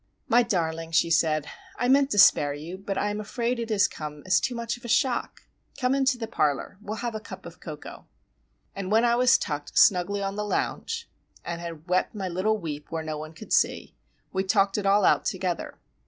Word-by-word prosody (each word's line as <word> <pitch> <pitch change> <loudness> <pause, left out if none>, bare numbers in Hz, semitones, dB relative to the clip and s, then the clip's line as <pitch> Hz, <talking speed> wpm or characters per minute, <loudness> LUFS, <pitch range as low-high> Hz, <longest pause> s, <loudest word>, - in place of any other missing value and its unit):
"My 240 +2 +5
darling," 165 -6 -1
she 165 +1 +3
said, 155 -2 +2 0.3
"I 245 - 0
meant 275 +1 +4
to 205 - -2
spare 145 -8 +6
you; 160 +5 -7
but 195 0 -5
I 205 - 0
am 210 - -4
afraid 235 +3 -2
it 230 -1 -4
has 205 -2 +3
come 150 -1 -8
as 185 0 +4
too 250 - -2
much 235 0 -3
of 245 - -16
a - - -6
shock. 240 +2 0 0.4
Come 250 0 +2
into 270 -1 +2
the 230 - -4
parlour. 155 -3 -1
We 215 - -18
will 215 - -3
have 235 +1 -4
a 215 - -4
cup - - -10
of - - -11
cocoa." - - -9 0.7
And 195 0 -4
when 225 +2 +4
I 235 0 +3
was 250 0 +5
tucked 145 -2 -5
snugly 200 +2 +4
on 195 0 -3
the 210 - -1
lounge 455 - -2 0.4
and 170 0 -4
had 165 -1 -8
wept 185 +4 0
my 195 -2 -3
little 190 +5 0
weep 150 -6 -6
where 160 -1 -3
no 155 -1 -4
one 155 +1 -8
could 155 - -7
see,—we 190 - -1
talked 195 0 +2
it 200 - -2
all 200 0 +4
out - - +4
together. 180 -2 -3
195 Hz, 215 wpm, -26 LUFS, 165-230 Hz, 0.7 s, spare